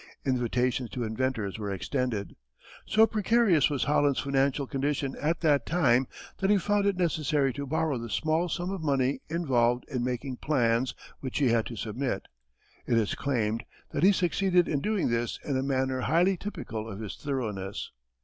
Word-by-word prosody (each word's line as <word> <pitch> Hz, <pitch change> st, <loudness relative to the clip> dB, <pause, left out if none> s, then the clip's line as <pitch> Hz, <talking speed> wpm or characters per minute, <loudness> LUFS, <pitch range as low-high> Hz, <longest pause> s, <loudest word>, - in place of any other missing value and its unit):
Invitations 125 Hz, -1 st, 0 dB
to 125 Hz, -, -4 dB
inventors 110 Hz, -3 st, -2 dB
were 105 Hz, -2 st, -3 dB
extended. 110 Hz, +2 st, -2 dB, 0.5 s
So 220 Hz, +1 st, +6 dB
precarious 215 Hz, -, +3 dB
was 145 Hz, -3 st, 0 dB
Holland's 145 Hz, -2 st, +2 dB
financial 140 Hz, 0 st, +1 dB
condition 140 Hz, 0 st, -1 dB
at 160 Hz, +3 st, 0 dB
that 150 Hz, -4 st, +3 dB
time 130 Hz, -7 st, +3 dB, 0.3 s
that 190 Hz, -, +1 dB
he 205 Hz, -, +5 dB
found 205 Hz, +2 st, +1 dB
it 200 Hz, -2 st, +1 dB
necessary 150 Hz, -6 st, +1 dB
to 140 Hz, +2 st, -5 dB
borrow 150 Hz, -2 st, 0 dB
the 115 Hz, 0 st, -6 dB
small 160 Hz, +8 st, 0 dB
sum 175 Hz, +3 st, -2 dB
of 195 Hz, -3 st, -4 dB
money 135 Hz, -3 st, +1 dB
involved 125 Hz, -7 st, +1 dB
in 125 Hz, -4 st, -2 dB
making 125 Hz, +1 st, -3 dB
plans 125 Hz, -3 st, +1 dB, 0.2 s
which 130 Hz, -2 st, -4 dB
he 140 Hz, -4 st, +3 dB
had 115 Hz, -1 st, +2 dB
to 120 Hz, -, -7 dB
submit. 115 Hz, 0 st, -3 dB, 0.6 s
It 115 Hz, -, +3 dB
is 110 Hz, -3 st, +1 dB
claimed 115 Hz, -5 st, -1 dB, 0.3 s
that -, -, -2 dB
he 190 Hz, +4 st, +7 dB
succeeded 180 Hz, -1 st, +2 dB
in 145 Hz, -, 0 dB
doing 210 Hz, -5 st, 0 dB
this 115 Hz, 0 st, -1 dB
in 140 Hz, -, -1 dB
a 130 Hz, -, +1 dB
manner 130 Hz, -1 st, 0 dB
highly 175 Hz, +8 st, +3 dB
typical 115 Hz, -, -6 dB
of 100 Hz, -1 st, -7 dB
his 110 Hz, -3 st, -5 dB
thoroughness. 105 Hz, -9 st, -4 dB
135 Hz, 170 wpm, -28 LUFS, 120-160 Hz, 0.6 s, he